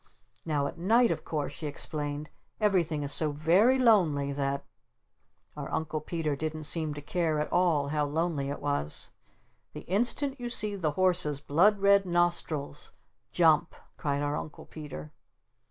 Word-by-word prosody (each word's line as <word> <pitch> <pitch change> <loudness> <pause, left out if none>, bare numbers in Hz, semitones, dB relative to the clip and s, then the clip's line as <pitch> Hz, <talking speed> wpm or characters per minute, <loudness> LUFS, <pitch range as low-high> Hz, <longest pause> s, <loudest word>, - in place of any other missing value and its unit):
"Now 145 -3 +1
at 165 - -5
night, 230 +6 +4
of 160 -2 -3
course," 150 -2 -3
she 155 0 -5
explained, 145 0 -5 0.3
"everything 175 -8 +1
is 140 - 0
so 155 -2 +2
very 175 - +4
lonely 175 - +3
that 140 0 -2 0.5
" - - -41
Our - - -6
Uncle 155 -1 -2
Peter 155 -2 -2
didn't 155 +2 -4
seem 155 -1 0
to 145 - -8
care 160 -1 0
at 150 - -3
all 160 -6 +2
how 150 0 0
lonely 150 -2 -1
it 140 - -5
was. 145 - -2 0.6
"The - - -7
instant 245 - 0
you 240 -1 -4
see 210 -4 -1
the 160 -6 -1
horses's 175 -5 +2
blood 195 +9 +3
red 200 -1 +5
nostrils, 170 -4 -1 0.4
JUMP!" 165 -1 +3 0.2
cried 145 -1 -1
our 145 0 -1
Uncle 155 - -8
Peter. 140 - -9
155 Hz, 155 wpm, -29 LUFS, 145-180 Hz, 0.6 s, red